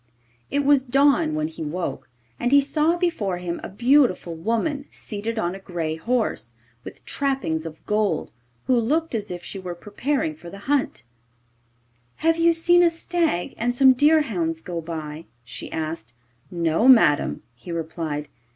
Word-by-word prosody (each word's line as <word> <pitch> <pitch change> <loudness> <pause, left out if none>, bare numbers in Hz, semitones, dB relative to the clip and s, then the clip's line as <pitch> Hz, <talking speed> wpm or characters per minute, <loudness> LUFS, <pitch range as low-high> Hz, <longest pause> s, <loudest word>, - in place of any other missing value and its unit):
It 285 0 0
was 280 -2 +5
dawn 270 - +3
when 155 0 0
he 160 0 -9
woke, 150 -5 -4 0.3
and 245 - 0
he 285 - +7
saw 300 +4 +1
before 280 - -1
him 175 -1 -4
a - - -5
beautiful 240 - +2
woman 230 - -1
seated 220 +2 -5
on 175 -4 -1
a 195 - -8
grey 170 -4 -3
horse, 220 - -2 0.3
with - - -11
trappings 265 - -1
of 160 0 -12
gold, 210 -6 0 0.3
who 255 - +3
looked 300 +8 0
as 215 -3 -3
if 175 -1 -6
she 195 - -6
were 180 -2 -6
preparing 205 - -2
for 170 +3 -12
the 200 - -10
hunt. 275 - 0 1.1
'Have 330 +1 +1
you 335 0 +5
seen 345 +2 +4
a 345 - +6
stag 330 - -1
and 245 +2 0
some 265 +1 +7
deerhounds 235 - +2
go 170 -2 -4
by?' 160 -1 -6 0.2
she 115 - -7
asked. 155 -7 -5 0.3
'No, 170 +5 +1
madam,' 225 - +5
he 125 +8 -10
replied. 160 -2 -4
205 Hz, 160 wpm, -23 LUFS, -, 1.1 s, he